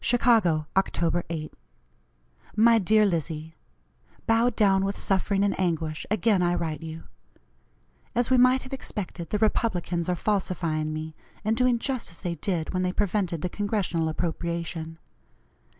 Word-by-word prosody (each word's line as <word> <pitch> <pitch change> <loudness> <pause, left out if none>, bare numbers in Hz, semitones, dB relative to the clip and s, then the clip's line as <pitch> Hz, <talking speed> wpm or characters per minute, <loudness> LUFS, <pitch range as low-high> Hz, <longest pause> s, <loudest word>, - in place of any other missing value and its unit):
"CHICAGO, 225 -10 +3
Oct. 175 -3 +1
8. 155 -2 -5 1.0
"MY 225 +1 +6
DEAR 215 +2 +4
LIZZIE: 160 -3 -2 0.7
Bowed 230 +1 +3
down 195 -2 +3
with 195 +1 -2
suffering 195 +1 +1
and 205 - +2
anguish, 160 -4 -1
again 215 -2 +2
I 175 0 +2
write 160 -3 -3
you. 160 0 -7 1.1
As 245 +1 +1
we 260 - +6
might 255 +1 +5
have 260 - -9
expected, 185 -9 -5
the 210 - 0
Republicans 180 -5 0
are 180 - +2
falsifying 170 -5 -1
me, 155 +1 -5 0.3
and 220 +1 +2
doing 250 0 +3
just 255 0 -3
as 165 - -12
they 175 -3 -2
did 170 0 -2
when 185 - 0
they 180 0 0
prevented 185 -4 -1
the 180 - 0
Congressional 195 -5 -1
appropriation. 165 0 -3
180 Hz, 145 wpm, -26 LUFS, 165-215 Hz, 1.1 s, MY